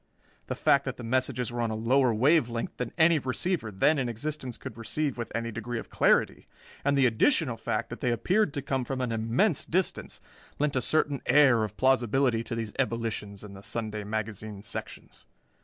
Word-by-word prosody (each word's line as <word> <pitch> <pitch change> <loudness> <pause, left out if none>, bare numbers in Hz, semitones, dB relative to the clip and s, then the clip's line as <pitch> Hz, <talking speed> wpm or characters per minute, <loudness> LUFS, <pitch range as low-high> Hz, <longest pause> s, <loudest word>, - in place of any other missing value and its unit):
The - - -3
fact 140 0 +3
that 135 -1 -4
the 120 - -8
messages 125 0 -1
were 120 0 -3
on 115 - 0
a 110 - -2
lower 125 +3 +3
wave 130 +4 +3
length 115 0 -4
than 125 -2 -3
any 165 -1 +5
receiver 130 0 -2
then 105 +10 +2
in 125 -2 -1
existence 130 +1 -5
could - - -8
receive 135 +5 -2
with 120 -1 -5
any 115 0 -2
degree 115 +2 -4
of - - -7
clarity, - - +2 0.4
and 140 0 +2
the 135 - +5
additional 125 - +2
fact - - -3
that - - -6
they 125 - +1
appeared 185 - +1
to 140 - -3
come 135 -2 -1
from 130 +2 -4
an 125 -2 -1
immense 115 - +1
distance 185 +2 -2 0.4
lent 145 -1 0
a 130 - +2
certain 145 +1 +1
air 130 -6 +5
of 105 -1 -5
plausibility 130 -2 +2
to 115 - -4
these 115 -2 -4
ebullitions 115 -5 -2
in 105 -2 -10
the 95 - -11
Sunday 110 0 -3
magazine 105 -1 -5
sections. - - -7
120 Hz, 195 wpm, -28 LUFS, 115-140 Hz, 0.4 s, any